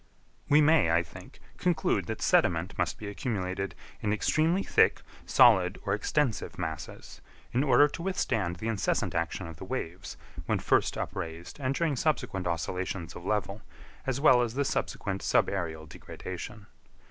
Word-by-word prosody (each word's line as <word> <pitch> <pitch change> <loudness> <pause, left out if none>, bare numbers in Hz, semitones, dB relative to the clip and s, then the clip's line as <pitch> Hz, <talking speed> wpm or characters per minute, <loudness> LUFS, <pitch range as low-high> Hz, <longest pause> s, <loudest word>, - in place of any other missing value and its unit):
We 150 +2 +6
may, 150 - +5
I 85 +1 +3
think, - - -13 0.2
conclude - - +1
that - - -4
sediment 90 +2 +2
must - - -1
be 105 - -7
accumulated 95 -4 -3 0.3
in 105 - 0
extremely 160 - +2
thick, - - +3 0.2
solid, 90 0 +5
or 95 - +1
extensive 120 +3 -1
masses, 80 -2 -6 0.3
in 125 +3 +2
order 145 +1 +6
to 155 - -7
withstand 115 - -1
the 110 +6 -5
incessant 110 -4 0
action 85 +3 -2
of 80 -2 -9
the - - -8
waves, 95 -5 -5 0.3
when - - +2
first - - +1
upraised 85 - -5
and 135 0 -1
during 160 -3 +1
subsequent 125 - -1
oscillations 90 +1 -3
of 90 - -9
level, 105 0 -1 0.5
as 135 0 0
well 130 -4 +6
as 120 -1 -2
the 140 +1 +1
subsequent 100 -6 -2
subaërial 80 -5 0
degradation. 95 +6 -8
100 Hz, 150 wpm, -29 LUFS, 90-130 Hz, 0.5 s, We